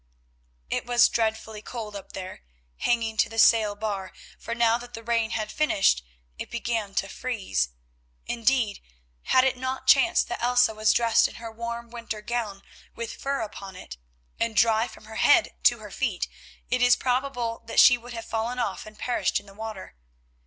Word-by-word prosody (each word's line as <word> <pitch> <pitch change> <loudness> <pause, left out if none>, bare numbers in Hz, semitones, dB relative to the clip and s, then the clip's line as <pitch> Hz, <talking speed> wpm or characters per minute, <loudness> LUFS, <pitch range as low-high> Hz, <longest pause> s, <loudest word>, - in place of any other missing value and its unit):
It - - -2
was 240 0 +6
dreadfully 220 -1 -2
cold 215 -3 -7
up 200 - -9
there 185 - -7 0.4
hanging 225 -2 0
to - - +3
the 225 - -9
sail 220 -2 +5
bar, 205 -3 -4 0.3
for 230 - -5
now 235 0 +3
that 245 0 -10
the 225 - -9
rain 230 -1 +1
had 215 -1 -3
finished, 195 - +2 0.4
it - - -6
began 225 -4 -3
to 195 - 0
freeze. 200 - -2 0.6
Indeed, 230 -3 +1 0.4
had 255 - +4
it 265 -1 +1
not 260 +1 -4
chanced - - +5
that - - -4
Elsa 245 -1 +3
was 215 0 +3
dressed 230 -2 +4
in - - -12
her 230 -1 -8
warm 235 +1 -6
winter 230 -3 -6
gown 220 -4 -3 0.3
with 230 -1 -5
fur 275 -2 -2
upon 200 -3 -7
it, 60 - -10 0.4
and 230 -1 -1
dry 225 +1 +4
from 215 - -14
her 220 0 -9
head 325 +4 +4
to - - +6
her - - -11
feet, - - -1 0.4
it 255 - +1
is 245 0 +6
probable 245 -2 -1
that - - +1
she 250 - +9
would 240 0 -10
have 230 -1 -6
fallen 230 +3 -2
off 215 -4 -3
and 215 0 -13
perished 245 - 0
in - - -18
the 195 - -14
water. 215 -2 -7
230 Hz, 180 wpm, -26 LUFS, 215-240 Hz, 0.6 s, she